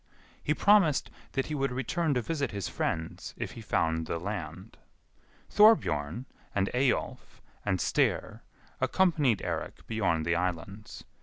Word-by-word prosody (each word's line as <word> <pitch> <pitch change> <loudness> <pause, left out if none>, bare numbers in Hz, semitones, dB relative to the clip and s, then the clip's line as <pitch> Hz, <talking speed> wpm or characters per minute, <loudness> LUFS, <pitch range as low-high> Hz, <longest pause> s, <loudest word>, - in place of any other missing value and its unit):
He 150 - 0
promised 195 -8 +4 0.2
that 135 -2 0
he 155 - -5
would 135 -2 0
return 145 +5 0
to 125 - 0
visit 145 -4 -1
his 100 -2 -4
friends 80 0 -3
if - - -4
he 115 - -9
found 80 -6 0
the 85 - -2
land. 90 +1 -6 0.7
Thorbjorn, 120 - +4 0.3
and 100 -1 +1
Eyjolf, 130 +1 -1 0.2
and 95 -3 +1
Styr - - 0 0.4
accompanied 150 - +2
Eirik - - -4
beyond 90 -8 0
the 85 - +2
islands. 90 +4 -4
110 Hz, 135 wpm, -29 LUFS, 85-145 Hz, 0.7 s, promised